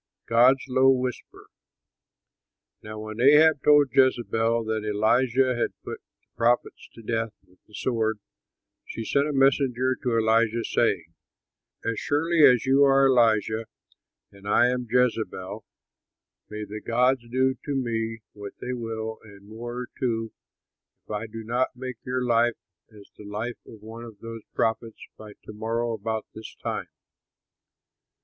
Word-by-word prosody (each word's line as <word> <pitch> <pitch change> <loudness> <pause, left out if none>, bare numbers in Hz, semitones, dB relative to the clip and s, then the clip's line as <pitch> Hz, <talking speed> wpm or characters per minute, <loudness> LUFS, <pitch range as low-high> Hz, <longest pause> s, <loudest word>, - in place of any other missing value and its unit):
GOD'S 125 +3 +4
LOW 130 +1 +4
WHISPER 130 -2 -2 1.4
Now 110 0 -8
when 110 +1 -6
Ahab 150 +2 +6
told 145 -2 +5
Jezebel 115 -3 +2
that 110 -1 -2
Elijah 120 +5 +2
had 120 - -2
put - - -7 0.2
the - - -47
prophets 120 +1 0
to 115 - -12
death 115 -1 -2
with 90 0 -27
the 105 - -14
sword, 110 -1 -1 0.7
she 115 - -7
sent 140 +4 +1
a - - -2
messenger 135 -2 +2
to 120 -2 0
Elijah, 115 +1 +2
saying, 85 -9 0 0.7
"As 115 -1 -1
surely 160 +2 +1
as 125 -5 +6
you 135 +2 +4
are 135 0 +5
Elijah 115 -3 +2 0.6
and 100 0 -14
I 120 +4 +4
am 125 -1 -2
Jezebel, 110 -5 -1 0.9
may 105 0 -6
the 105 +1 -8
gods 125 +3 +2
do 130 +2 +2
to 145 - -3
me 115 -3 -2
what 100 -1 -9
they 125 - -4
will 110 -2 -5
and 100 -2 -16
more 120 +3 -6
too, 115 -4 -2 0.7
if - - -12
I 105 +2 -3
do 110 +1 -8
not 120 +4 -1
make 130 -1 -6
your 125 0 -2
life 120 0 +2 0.4
as 105 -2 -15
the - - -10
life 110 +4 -5
of 110 -2 -13
one 115 +2 -9
of 110 -3 -12
those 115 +1 -8
prophets 115 0 -1 0.2
by 105 -1 -12
to - - -10
morrow 115 +2 -2
about 110 0 -3
this 110 - -10
time." - - -5
115 Hz, 145 wpm, -25 LUFS, 110-125 Hz, 1.4 s, Ahab